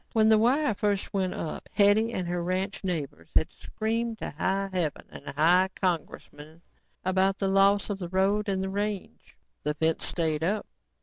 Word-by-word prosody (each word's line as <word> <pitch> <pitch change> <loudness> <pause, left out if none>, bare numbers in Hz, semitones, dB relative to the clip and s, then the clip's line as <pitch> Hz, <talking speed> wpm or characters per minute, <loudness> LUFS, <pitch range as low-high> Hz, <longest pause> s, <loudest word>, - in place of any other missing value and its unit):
When 220 -1 +4
the 220 -1 +6
wire 260 +4 +3
first 200 -1 -1
went 190 -2 0
up, 160 - -5
Hetty 210 +2 +4
and 185 -5 -3
her 175 0 -2
ranching 190 +2 -2
neighbors 140 - -4
had - - +2
screamed 225 +1 -3
to - - -5
high 195 +6 -1
heaven 170 -5 -2
and 140 - -11
high 180 +4 +5
congressmen 160 -2 -4 0.4
about 190 +1 +2
the 195 - -1
loss 195 +1 +4
of 195 - -4
the 175 -3 -5
road 200 +3 +1
and 190 0 -1
range. 205 - -4 0.2
The 150 - -2
fence 160 +1 0
stayed 160 -2 -1
up. 205 +4 0
190 Hz, 170 wpm, -27 LUFS, 170-205 Hz, 0.4 s, the